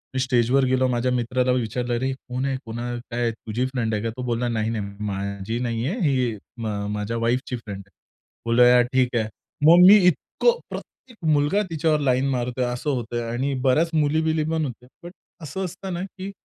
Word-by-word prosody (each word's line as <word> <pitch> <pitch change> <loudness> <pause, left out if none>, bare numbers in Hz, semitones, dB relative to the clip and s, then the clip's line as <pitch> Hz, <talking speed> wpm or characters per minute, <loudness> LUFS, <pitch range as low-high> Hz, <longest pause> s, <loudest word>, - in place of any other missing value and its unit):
मी - - +1
स्टेजवर 130 +1 +2
गेलो 130 0 +2
माझ्या 125 +1 0
मित्राला 125 +1 +1
विचारलं 120 0 -1
"अरे 130 +3 -1
कोण 130 0 -5
आहे, 135 -1 -1
कोण 115 0 -6 0.3
काय, 120 0 0
तुझी 115 +2 -3
फ्रेंड 120 -4 -2
आहे 105 +1 -1
का?" 115 - -1
तो 125 - -4
बोलला 120 0 -1
"नाही, 110 -1 -1
नाही 100 -3 -5
माझी 100 +3 -3
नाहीये 120 - -2
ही 130 -7 +1 0.2
म 115 -2 -4 0.3
माझ्या 105 +2 -3
वाईफची 120 +2 0
फ्रेंड 105 -4 -8
आहे." - - -28 0.5
बोलूया 125 +1 +6
ठीक 125 0 0
आहे. 110 - 0 0.4
मग 175 +2 +8
मी 205 - +10
इतकं 475 - +1
प्रत्येक 240 -4 -10 0.2
मुलगा 145 +8 +2
तिच्यावर 155 -1 +1
लाईन 130 -1 +1
मारतोय 125 0 -1
असं 125 +4 -3
होतय 120 -3 -2
आणि 135 +4 -1
बऱ्याच 155 +6 +3
मुली-बिली 155 +1 +1
पण 160 -2 0
होत्या. 125 -1 -8
बट 175 - -8 0.3
असं 190 +5 -4
असत 180 +2 -9
ना 175 - -3
की 195 0 -7
125 Hz, 180 wpm, -23 LUFS, 115-145 Hz, 0.5 s, मी